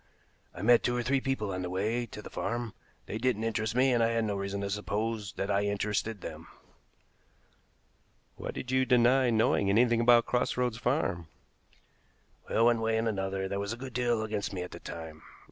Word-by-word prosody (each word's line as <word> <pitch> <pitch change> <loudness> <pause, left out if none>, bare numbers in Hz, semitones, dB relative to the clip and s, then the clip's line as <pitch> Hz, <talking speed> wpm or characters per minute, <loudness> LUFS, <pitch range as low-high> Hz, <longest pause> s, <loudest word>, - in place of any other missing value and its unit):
I - - -6
met 120 +2 +6
two 125 0 0
or 120 - -1
three 135 +2 +1
people 130 -7 -2
on 90 - -3
the 90 - -3
way 110 +6 -1
to 105 0 -9
the - - -10
farm. 120 -2 -3 0.3
They 110 - -4
didn't 120 -3 0
interest 110 0 -1
me, 130 +1 +4
and 120 - +2
I 115 - +4
had 115 -1 0
no 105 -2 -1
reason 100 0 -3
to 100 - -2
suppose 105 +1 -2
that 100 +1 -2
I 100 +1 +2
interested 105 +1 -1
them." - - -8 1.9
"Why - - -6
did 125 - -5
you 130 0 +3
deny 125 +1 +4
knowing 110 -3 +2
anything 115 +3 +4
about 120 0 +6
Cross 125 0 0
Roads 125 -2 0
Farm?" 120 - 0 1.2
"Well, 115 - +3
one 120 -1 +3
way 110 0 +1
and 115 +1 0
another 95 -2 -2
there 100 +1 -3
was 100 +2 -2
a - - -7
good 130 0 -8
deal 120 -2 +1
against 105 -2 -3
me 90 -2 -3
at 90 - -8
the - - -8
time. 80 -1 -8
110 Hz, 200 wpm, -30 LUFS, 100-120 Hz, 1.9 s, met